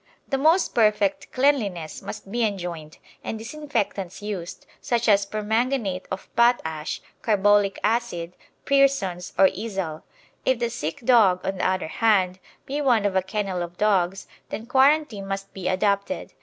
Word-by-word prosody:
The 270 - 0
most 325 +6 +3
perfect 210 -3 +2
cleanliness 215 - 0
must 195 - -8
be 240 +1 0
enjoined, 175 -7 -4 0.3
and 220 - -4
disinfectants 225 - -3
used, 200 -5 -6 0.2
such 235 -1 0
as 200 -2 +4
permanganate 215 -2 -1
of 190 - -5
potash, 160 -11 +1 0.2
carbolic 205 -2 +3
acid, 210 -7 -1 0.3
Pearson's, 270 -11 +2
or 195 - +7
Izal. 190 -7 -4 0.4
If 260 - +2
the 235 0 -1
sick 165 -7 -4
dog, 220 -7 +4
on 190 -1 -2
the - - +2
other 185 -3 -1
hand, 190 -2 +2 0.3
be 285 +2 -3
one 240 -7 +3
of 200 -2 0
a 190 - +4
kennel 190 -1 -3
of 175 0 -6
dogs, 195 -3 +1 0.2
then 220 - -5
quarantine 265 -5 +2
must 195 0 -5
be 185 -2 -5
adopted. 200 +6 0
205 Hz, 145 wpm, -24 LUFS, 185-235 Hz, 0.4 s, or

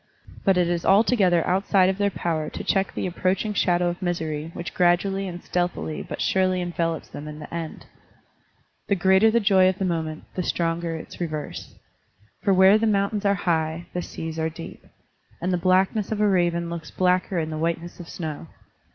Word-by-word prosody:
But 195 -2 +3
it 180 -1 +3
is 175 -1 -1
altogether 195 -4 +4
outside 190 0 +3
of 190 +1 -1
their 205 0 +3
power 160 -5 -2
to - - -6
check 195 0 +1
the - - -2
approaching 185 +3 -1
shadow 175 -3 +2
of 175 +2 -3
misery 160 -3 -2
which 170 - -6
gradually 190 +2 +2
and 175 -1 -7
stealthily 175 -3 -2
but - - -6
surely 185 -1 +2
envelops 170 -2 -2
them 150 - -8
in 150 0 -7
the 150 +1 -10
end. 165 -2 -5 1.0
The 200 - +2
greater 190 +4 +4
the 235 +2 +3
joy 190 -3 +5
of 190 - -2
the 195 - -1
moment, 160 -3 -2
the 185 - -2
stronger 170 -1 -1
its 160 - -9
reverse. 155 -3 -5 0.7
For 200 - +2
where 190 +2 +6
the 225 - +1
mountains 205 0 0
are 200 0 +4
high, 160 0 0
the 180 - -2
seas 160 -1 -6
are 160 0 0
deep; 165 +1 -10 0.6
and 180 +2 -1
the - - +2
blackness 190 +4 +2
of 215 - -1
a 210 - +4
raven 175 -3 +1
looks 170 -2 -6
blacker 185 0 +1
in 160 -1 -1
the 155 - -4
whiteness 170 +2 -3
of 170 - -9
snow. 160 -2 -6
175 Hz, 190 wpm, -24 LUFS, 165-190 Hz, 1.0 s, where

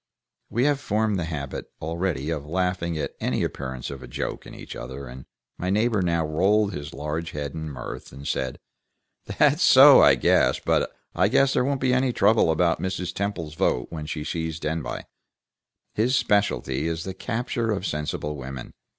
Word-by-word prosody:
We 120 - 0
had 145 -1 +2
formed 105 -5 0
the 85 - -2
habit 75 -5 -5
already 85 -2 -2
of 75 -3 -4
laughing 90 -1 -1
at 70 -2 -3
any - - 0
appearance 65 -2 -4
of 70 -2 -9
joke - - -4
in - - -10
each - - -9
other, 70 - -7
and 65 +1 -10 0.3
my 90 - -2
neighbor 105 +1 +2
now 85 -2 +1
rolled 100 +6 +2
his 75 +1 -6
large 75 +4 -4
head 75 -1 -4
in 80 -1 -5
mirth, 65 -4 -7
and 70 +1 -9
said: 65 -1 -2 0.7
"That's - - +3
so, - - +9
I - - +7
guess. - - +3
But - - +1 0.2
I 90 +2 +3
guess 135 +4 +3
there - - +2
won't 135 0 -1
be 130 -1 +2
any 130 0 +2
trouble 105 -4 +4
about 85 +1 +2
Mrs. 90 -1 -3
Temple's 95 -6 -3
vote 60 -5 0
when 75 -2 -5
she 75 -1 -4
sees 80 0 -3
Denbigh. 80 -2 -3 0.9
His 120 +5 +2
specialty 100 - +1
is 85 0 -2
the 95 - -5
capture 115 +1 -2
of 100 -3 -1
sensible 75 -1 -3
women. 65 -2 -7
85 Hz, 175 wpm, -25 LUFS, 75-105 Hz, 0.9 s, so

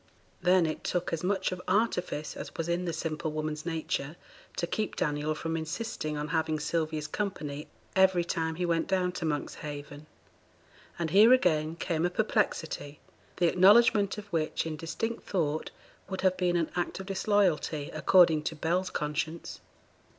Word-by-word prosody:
Then 180 -1 +4
it 155 - -3
took 180 -1 -1
as 165 +1 -2
much 195 +1 0
of 180 -1 -5
artifice 185 -6 0
as - - -8
was 165 - -3
in 175 +1 0
the 170 - -1
simple 155 -1 -3
woman's 155 +1 -3
nature 160 -2 -2 0.4
to - - 0
keep 215 +4 -2
Daniel 150 +1 -1
from 165 +1 -3
insisting 160 -1 -3
on 150 0 -3
having 160 -1 0
Sylvia's 155 0 -1
company 150 -5 -4 0.3
every 190 -2 +4
time 160 -1 -2
he 180 +2 -1
went 165 -1 +1
down 185 -2 +1
to 175 - -4
Monkshaven. 145 -1 -5 0.9
And 165 -2 -2
here, 215 +6 +8
again, 160 -9 +2
came 170 -1 -1
a 175 - +3
perplexity, 180 -7 -1 0.4
the 175 - +3
acknowledgement 200 +3 +5
of 210 - -7
which 160 -1 0
in 160 -1 -3
distinct 165 +9 -4
thought 155 -5 0 0.4
would 190 - -3
have 185 -1 +3
been 180 -1 +1
an 165 -2 0
act 175 +1 -2
of 190 - -6
disloyalty, 190 -7 +1
according 170 -4 +5
to 160 - -2
Bell's 175 +4 0
conscience. 155 +2 -3
165 Hz, 160 wpm, -29 LUFS, 155-185 Hz, 0.9 s, here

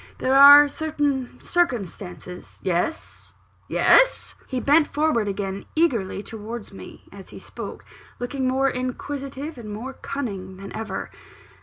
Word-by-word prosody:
There 260 +1 +1
are 285 +1 +10
certain 290 -4 -2
circumstances 190 - -3
" - - -27
"Yes 185 - -3 0.3
yes?" - - +4
He 255 - -2
bent 295 +4 +4
forward 295 -8 +1
again 195 0 -4
eagerly 230 - 0
towards 220 +1 -8
me, - - -12
as - - -12
he - - -11
spoke; - - -9 0.3
looking 260 +1 -2
more 265 +1 +2
inquisitive 275 +3 -4
and 215 -3 -8
more 240 +6 -6
cunning 195 -11 -6
than 195 +1 -9
ever. 215 -4 -5
255 Hz, 130 wpm, -23 LUFS, 205-285 Hz, 0.3 s, are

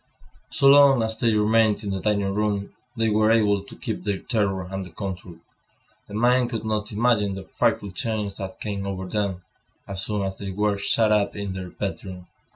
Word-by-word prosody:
So 140 - -1
long 140 -3 +7
as 110 0 -2
they 115 +1 +2
remained 110 0 +3
in 100 - -3
the 95 - -2
dining 100 -1 0
room, 105 -1 -1 0.2
they 115 -1 +2
were 110 +1 +3
able 105 -3 +3
to - - -13
keep - - -4
their 100 -1 -1
terror 100 -4 -1
under 95 -1 -5
control. 90 -1 -7 0.7
The 100 - -8
mind 120 +2 +3
could 115 -2 -4
not 105 -1 -1
imagine 105 -3 +2
the 95 - -7
frightful 100 0 0
change 105 +1 -3
that 95 -1 -7
came 100 -2 -4
over 95 -1 -4
them, 95 -2 -2 0.4
as 95 -1 -3
soon 105 -2 -2
as 95 0 -4
they 100 - -5
were 100 +1 0
shut 110 +2 +2
up 105 -1 +2
in 100 -2 -4
their 95 -1 -6
bedroom. 95 -2 -6
105 Hz, 190 wpm, -24 LUFS, 95-110 Hz, 0.7 s, long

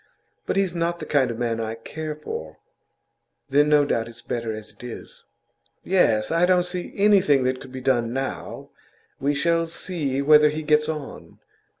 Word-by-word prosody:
But - - 0
he's 195 -3 +1
not 170 0 -1
the - - -7
kind 135 -4 +2
of 115 - -4
man 115 -1 -1
I 110 0 -3
care 155 +6 -6
for.' 80 - -7 0.9
'Then 145 +2 +4
no 150 -1 +5
doubt 115 -5 -1
it's 120 +1 -12
better 115 -2 -3
as 110 0 -8
it - - -19
is.' 120 -2 -10 0.6
'Yes. 115 - +2
I 170 +2 +3
don't 180 -1 +3
see 180 0 -4
that - - -17
anything 195 -10 +4
could 130 +1 -3
be 130 0 -7
done 120 -3 +1
now. 135 +2 -5 0.5
We 145 +2 0
shall 165 +3 +1
see 165 -5 -3
whether 150 +1 +6
he 155 +1 -4
gets 150 0 +2
on. 155 -3 -7
145 Hz, 180 wpm, -24 LUFS, 120-165 Hz, 0.9 s, whether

